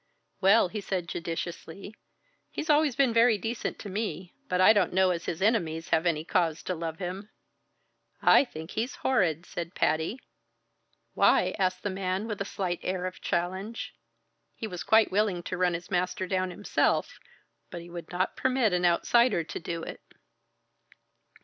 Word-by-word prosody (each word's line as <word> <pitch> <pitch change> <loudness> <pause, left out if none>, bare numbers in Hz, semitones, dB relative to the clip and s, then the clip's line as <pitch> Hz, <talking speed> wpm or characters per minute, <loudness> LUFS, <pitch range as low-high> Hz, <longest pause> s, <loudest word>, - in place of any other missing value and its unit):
"Well," 195 0 +5
he 210 +2 -4
said 185 -3 -3
judiciously, 170 +4 -5 0.6
"he's 310 - -1
always 295 -3 +3
been 270 -4 +3
very 230 -1 +5
decent 225 +4 -3
to - - -8
me, 185 -4 -4 0.2
but 180 - 0
I 185 +4 +7
don't 200 -5 +1
know 190 0 +4
as 170 -1 -3
his 170 +3 -3
enemies 170 -7 +1
have 165 +1 +2
any 155 -2 0
cause 165 -3 0
to 185 - -2
love 165 -1 -4
him." 190 +3 -5 0.9
"I - - +6
think 160 -8 -9
he's 230 +4 -2
horrid!" 180 - +2
said 170 0 -6
Patty. 160 - 0 0.9
"Why?" - - +3
asked 185 -1 0
the 205 - -1
man 190 +2 -2
with 210 -3 -4
a - - -1
slight 180 -3 -3
air 185 0 -2
of 185 - -6
challenge. 190 +6 -3 0.6
He - - -5
was 180 -5 -6
quite 220 +6 +4
willing 195 -3 +1
to 185 - -4
run 180 -1 +1
his 175 +3 -8
master 180 0 0
down 185 0 -1
himself, 200 +3 0 0.5
but 170 - -7
he 170 - -12
would 170 -1 -8
not 180 +1 -1
permit 255 -6 +1
an 180 0 +1
outsider 200 +3 +3
to 160 - -6
do 165 0 -5
it. - - -7
185 Hz, 170 wpm, -28 LUFS, 170-210 Hz, 0.9 s, I